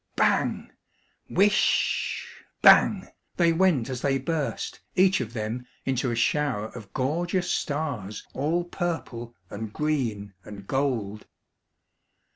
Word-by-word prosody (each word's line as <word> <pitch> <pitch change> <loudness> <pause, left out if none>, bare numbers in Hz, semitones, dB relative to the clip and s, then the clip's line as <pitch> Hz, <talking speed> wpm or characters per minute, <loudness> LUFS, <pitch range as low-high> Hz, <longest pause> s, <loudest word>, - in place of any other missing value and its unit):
Whish! - - -47
bang! - - -1 0.6
whish! 205 +2 +2 0.4
bang! - - +6 0.3
they 170 -2 +4
went 165 -9 +3
as 130 -2 -4
they 135 -1 +2
burst, 150 +2 -3 0.2
each 190 -4 +4
of 115 -3 -5
them, 115 +2 -4 0.2
into 130 -1 0
a 120 - -1
shower 125 -3 0
of 105 -5 -10
gorgeous 175 - -1
stars 140 -10 -3
all 160 +6 0
purple, 160 -10 -4 0.2
and 105 +1 -5
green, 115 -9 -2
and 100 0 -10
gold. 115 -6 -1
135 Hz, 115 wpm, -26 LUFS, 110-160 Hz, 0.6 s, bang